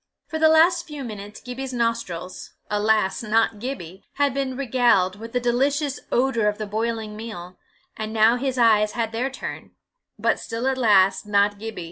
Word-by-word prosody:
For 315 Hz, -, -5 dB
the 315 Hz, 0 st, +6 dB
last 335 Hz, +2 st, +4 dB
few 295 Hz, -3 st, -7 dB
minutes, 210 Hz, -3 st, -8 dB
Gibbie's 255 Hz, +1 st, -6 dB
nostrils 230 Hz, -7 st, -3 dB, 0.2 s
alas! 210 Hz, -2 st, +1 dB
not 225 Hz, -1 st, +1 dB
Gibbie 200 Hz, -7 st, -6 dB
had 285 Hz, -2 st, +1 dB
been 265 Hz, -2 st, -2 dB
regaled 235 Hz, -8 st, +2 dB
with 230 Hz, +2 st, -9 dB
the 250 Hz, -, 0 dB
delicious 270 Hz, +4 st, 0 dB
odour 240 Hz, -4 st, +2 dB
of 210 Hz, 0 st, 0 dB
the 215 Hz, -, -4 dB
boiling 220 Hz, 0 st, -3 dB
meal; 185 Hz, -5 st, -8 dB, 0.4 s
and 215 Hz, 0 st, -5 dB
now 220 Hz, +1 st, +4 dB
his 260 Hz, +1 st, -2 dB
eyes 215 Hz, -3 st, +4 dB
had 230 Hz, -2 st, -2 dB
their 240 Hz, +4 st, -1 dB
turn 270 Hz, -, -8 dB, 0.4 s
but -, -, +1 dB
still, 230 Hz, +2 st, -4 dB
alas, 205 Hz, -8 st, +3 dB
not 205 Hz, 0 st, +2 dB
Gibbie! 225 Hz, -2 st, -6 dB
230 Hz, 165 wpm, -23 LUFS, 210-260 Hz, 0.4 s, the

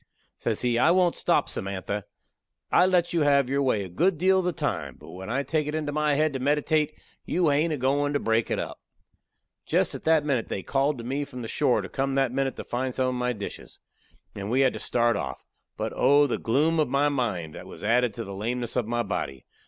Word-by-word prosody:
Says -, -, -2 dB
he, 120 Hz, -1 st, +2 dB
"I 155 Hz, -, +5 dB
won't 180 Hz, -1 st, +4 dB
stop, -, -, +1 dB
Samantha. 100 Hz, +1 st, -4 dB, 0.7 s
I 180 Hz, -, +5 dB
let 175 Hz, -2 st, +2 dB
you 170 Hz, -, +2 dB
have 140 Hz, -3 st, +3 dB
your 140 Hz, +1 st, +2 dB
way 125 Hz, -7 st, +1 dB
a -, -, -6 dB
good 170 Hz, -, +1 dB
deal 190 Hz, +3 st, +4 dB
of 185 Hz, -, -2 dB
the 180 Hz, -, +2 dB
time; 160 Hz, -, -3 dB
but -, -, -12 dB
when 95 Hz, +2 st, -8 dB
I 135 Hz, +4 st, 0 dB
take 155 Hz, 0 st, -1 dB
it 150 Hz, -, -2 dB
into 150 Hz, -2 st, -2 dB
my 150 Hz, 0 st, +1 dB
head 155 Hz, 0 st, +2 dB
to 135 Hz, -, -3 dB
meditate, 150 Hz, +2 st, +1 dB, 0.3 s
you 175 Hz, -3 st, +1 dB
hain't 150 Hz, +3 st, +2 dB
a 150 Hz, -, -1 dB
goin' 140 Hz, +2 st, +1 dB
to 145 Hz, -, +1 dB
break 115 Hz, 0 st, +1 dB
it -, -, 0 dB
up." -, -, -5 dB, 0.8 s
Jest -, -, +1 dB
at -, -, -6 dB
that 160 Hz, -2 st, +4 dB
minute 130 Hz, -6 st, 0 dB
they 95 Hz, -, -4 dB
called 140 Hz, +1 st, +1 dB
to 115 Hz, -, -7 dB
me 135 Hz, +4 st, -2 dB
from 125 Hz, -4 st, -8 dB
the -, -, -5 dB
shore 125 Hz, -5 st, +1 dB
to -, -, -5 dB
come 135 Hz, +3 st, -2 dB
that 135 Hz, -2 st, +2 dB
minute 135 Hz, +1 st, -1 dB
to -, -, -6 dB
find 125 Hz, +1 st, -3 dB
some 130 Hz, -1 st, +1 dB
of -, -, -2 dB
my 125 Hz, 0 st, 0 dB
dishes. 100 Hz, -4 st, -7 dB, 0.5 s
And 100 Hz, 0 st, -5 dB
we 130 Hz, +4 st, +2 dB
had 130 Hz, -2 st, +3 dB
to -, -, -6 dB
start 120 Hz, -1 st, +1 dB
off. -, -, -5 dB, 0.3 s
But -, -, -3 dB
oh! 145 Hz, +1 st, +5 dB
the 135 Hz, -, -1 dB
gloom 150 Hz, +8 st, +2 dB
of 150 Hz, -4 st, +2 dB
my 140 Hz, +2 st, +2 dB
mind 105 Hz, -, -2 dB
that -, -, -9 dB
was -, -, -11 dB
added 120 Hz, +2 st, +3 dB
to -, -, -4 dB
the 100 Hz, -, -7 dB
lameness 120 Hz, +4 st, -3 dB
of 125 Hz, -4 st, 0 dB
my 120 Hz, 0 st, 0 dB
body. 70 Hz, -, -4 dB
135 Hz, 240 wpm, -26 LUFS, 120-150 Hz, 0.8 s, I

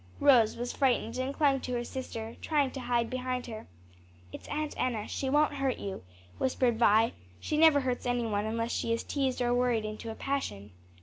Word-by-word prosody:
Rose 250 Hz, -6 st, +5 dB
was 245 Hz, +1 st, -3 dB
frightened 250 Hz, -2 st, +1 dB
and 260 Hz, +1 st, -1 dB
clung 280 Hz, -2 st, +2 dB
to 250 Hz, -, -5 dB
her 240 Hz, 0 st, -1 dB
sister, 230 Hz, -3 st, -6 dB
trying 290 Hz, -4 st, +1 dB
to 270 Hz, -, -6 dB
hide 240 Hz, -2 st, 0 dB
behind 255 Hz, 0 st, -3 dB
her. 220 Hz, -2 st, -8 dB, 0.7 s
"It's -, -, -9 dB
Aunt 305 Hz, 0 st, -3 dB
Enna; 230 Hz, -4 st, -1 dB
she 265 Hz, -, -2 dB
won't 295 Hz, +2 st, +3 dB
hurt 275 Hz, -2 st, -1 dB
you," 195 Hz, -, -6 dB, 0.4 s
whispered 250 Hz, -3 st, +1 dB
Vi; 225 Hz, 0 st, +4 dB, 0.3 s
"she -, -, -2 dB
never 310 Hz, -2 st, +6 dB
hurts 255 Hz, -1 st, -2 dB
any 245 Hz, -1 st, 0 dB
one 210 Hz, -1 st, -1 dB
unless 230 Hz, +1 st, -2 dB
she 230 Hz, -, -1 dB
is 230 Hz, -, 0 dB
teased 265 Hz, -3 st, -1 dB
or 240 Hz, 0 st, +2 dB
worried 245 Hz, -3 st, +1 dB
into 215 Hz, +1 st, -6 dB
a 220 Hz, -, -5 dB
passion." 105 Hz, -, -3 dB
245 Hz, 195 wpm, -30 LUFS, 230-270 Hz, 0.7 s, never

